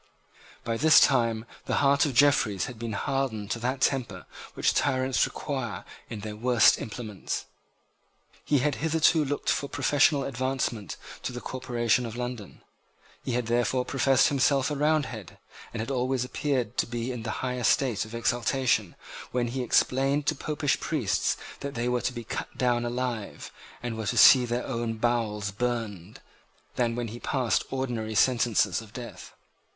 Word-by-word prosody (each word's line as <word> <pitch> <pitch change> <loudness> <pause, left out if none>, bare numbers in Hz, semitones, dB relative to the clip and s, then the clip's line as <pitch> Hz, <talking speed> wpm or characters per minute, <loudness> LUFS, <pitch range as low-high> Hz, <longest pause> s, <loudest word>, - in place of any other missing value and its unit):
By 115 0 -2
this 155 +5 +7
time 115 -4 +2 0.2
the - - 0
heart 140 +1 +3
of 135 - -4
Jeffreys 115 -9 +3
had 120 -3 -9
been 115 -1 -4
hardened 115 -3 -2
to 120 - -1
that 130 +3 -2
temper 120 -11 0 0.3
which - - +2
tyrants 130 -2 +1
require - - -5 0.2
in 105 - -6
their 105 0 -6
worst 120 +1 +4
implements. 110 -3 -5 1.0
He 145 - +2
had 150 - +2
hitherto 160 0 +3
looked 145 0 -1
for 140 - -1
professional 145 +1 +2
advancement 130 -6 -2 0.2
to - - -4
the 125 - -6
corporation 125 -2 -1
of 115 - -7
London. 120 -4 -6 0.6
He 125 - -3
had 125 0 0
therefore 120 +2 +1
professed 135 -1 +3
himself 140 0 +2
a - - -1
Roundhead, 140 - -1 0.3
and 120 - -6
had 115 - -4
always 130 -1 0
appeared 130 -1 -2
to - - +1
be 120 +1 -3
in 120 -3 -6
a - - -2
higher 125 +2 -3
state 125 -3 +2
of 110 +1 -9
exhilaration 120 -4 0 0.4
when 120 -1 0
he 130 +2 -3
explained 135 +4 +2
to 155 - +2
Popish 145 -1 -1
priests 115 - 0 0.2
that 140 0 -6
they 120 +1 -1
were 125 0 0
to - - -1
be 120 -2 -7
cut 135 +4 -6
down 120 -1 +1
alive, 120 -3 -4 0.3
and 120 -2 -3
were 110 -2 -4
to - - -1
see 125 -2 +8
their 120 +1 -2
own 115 -2 -2
bowels 110 -3 -1
burned, 110 -4 -4 0.5
than 120 -2 0
when 120 -2 -3
he 120 +3 -8
passed 125 -3 0
ordinary 120 -5 -3
sentences 115 -4 +2
of 110 -1 -14
death. 120 -1 -9
125 Hz, 165 wpm, -27 LUFS, 115-135 Hz, 1.0 s, see